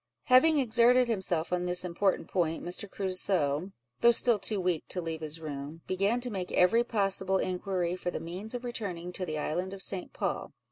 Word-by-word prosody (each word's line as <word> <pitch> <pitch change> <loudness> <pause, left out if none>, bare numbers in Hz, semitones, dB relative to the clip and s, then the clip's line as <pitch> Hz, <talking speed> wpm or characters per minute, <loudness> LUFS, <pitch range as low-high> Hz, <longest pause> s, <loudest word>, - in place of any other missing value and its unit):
Having 295 +5 +5
exerted 250 0 +4
himself 180 -7 -1
on 180 0 0
this 180 +1 +1
important 185 +2 0
point, 165 -3 -1
Mr. 180 +3 -3
Crusoe 185 -4 0 0.3
(though 235 - +6
still 235 -1 +4
too 195 +1 +2
weak 180 -3 0
to 185 - 0
leave 165 -2 -4
his 155 +1 -2
room) 150 +1 -7
began 195 +6 0
to 245 0 -2
make 185 -3 -4
every 230 +7 +4
possible 195 -4 0
inquiry 180 -1 -1
for 180 - -4
the - - -4
means 190 +8 -6
of 245 - -5
returning 190 -8 -4
to 185 0 -2
the 155 -1 -3
island 180 +6 -2
of 190 - -4
St. 190 -2 -2
Paul. - - -3
185 Hz, 190 wpm, -29 LUFS, 175-215 Hz, 0.3 s, though